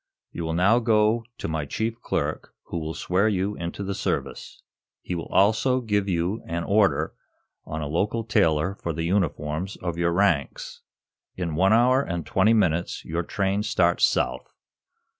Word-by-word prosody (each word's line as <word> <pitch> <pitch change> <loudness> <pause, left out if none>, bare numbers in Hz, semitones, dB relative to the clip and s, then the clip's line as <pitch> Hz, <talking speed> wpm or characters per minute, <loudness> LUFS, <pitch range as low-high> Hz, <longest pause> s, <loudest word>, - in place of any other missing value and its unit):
You 85 - -5
will 80 0 -2
now 100 +7 +4
go 110 0 +2
to - - -4
my 80 -2 -2
chief 115 +7 -3
clerk, - - -3
who 85 - -3
will 80 0 -5
swear 95 +4 +1
you 100 -1 0
into 85 +4 -5
the 100 0 -3
service. - - -4 0.4
He - - -4
will 85 -1 -4
also 110 +6 +3
give 105 -4 0
you 90 +4 -1
an 85 +1 -2
order 100 -7 +2 0.5
on 80 0 -4
a - - -3
local 100 +9 -1
tailor 95 -6 +2
for 85 -4 -4
the 80 +1 -3
uniforms 85 -1 -1
of 85 -1 -4
your 85 0 +2
ranks. 85 -6 0 0.5
In 85 -3 -3
one 95 +5 +3
hour 125 +4 +5
and 85 - -4
twenty 95 +8 +3
minutes 85 -5 0
your 80 +1 -2
train 100 +3 -1
starts 95 -6 +1
south. - - +1
95 Hz, 165 wpm, -25 LUFS, 85-105 Hz, 0.5 s, hour